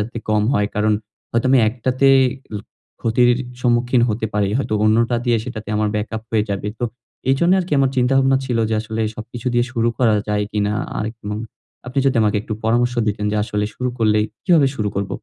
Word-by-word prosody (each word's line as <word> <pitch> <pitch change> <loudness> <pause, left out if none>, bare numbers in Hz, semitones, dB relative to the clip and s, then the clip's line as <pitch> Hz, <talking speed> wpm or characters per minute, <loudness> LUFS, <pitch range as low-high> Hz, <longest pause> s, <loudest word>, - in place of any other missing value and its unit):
আরকি - - -2
কম 105 -1 +2
হয়। 105 -4 +2
কারণ 105 +1 +2 0.4
হয়তো 115 +2 0
আমি 135 - +6
একটাতে 130 +3 0 0.5
ল - - -1 0.4
ক্ষতির 120 +2 +3 0.3
সম্মুখীন 120 0 +2
হতে 110 +1 -1
পারি। 100 -2 +1
হয়তো 135 -5 -2
অন্যটা 115 +3 +3
দিয়ে 120 -2 +3
সেটাতে 110 -4 -7
আমার 105 0 +1
ব্যাকআপ 110 +1 -3
হয়ে 110 -2 +2
যাবে। 100 +1 -2
তো - - -2 0.5
এইজন্য 170 +7 +3
আরকি 175 -4 -2
আমার 135 -1 +3
চিন্তা-ভাবনা 135 +1 +3
ছিল 120 -3 -1
যে 110 - 0
আসলে 110 0 -4
সবকিছু 120 +3 -7
দিয়ে 120 0 +2
শুরু 115 -2 +1
করা 115 -5 +3
যায় 105 0 0
কিনা? 105 0 0 0.2
আরেক 110 +2 -3
এবং 105 0 -5 0.5
আপনি 135 +2 -1
যদি 135 - +2
আমাকে 105 -1 +2
একটু 110 - -5
পরামর্শ 120 +2 +2
দিতেন, 105 0 -1
যে 105 - -1
আসলে 105 -1 -2
শুরু 125 0 -2
করলেই 105 -1 +2 0.2
কিভাবে 165 -7 +4
শুরু 105 -4 -1
করব? 100 0 -2
115 Hz, 195 wpm, -20 LUFS, 105-125 Hz, 0.5 s, আমি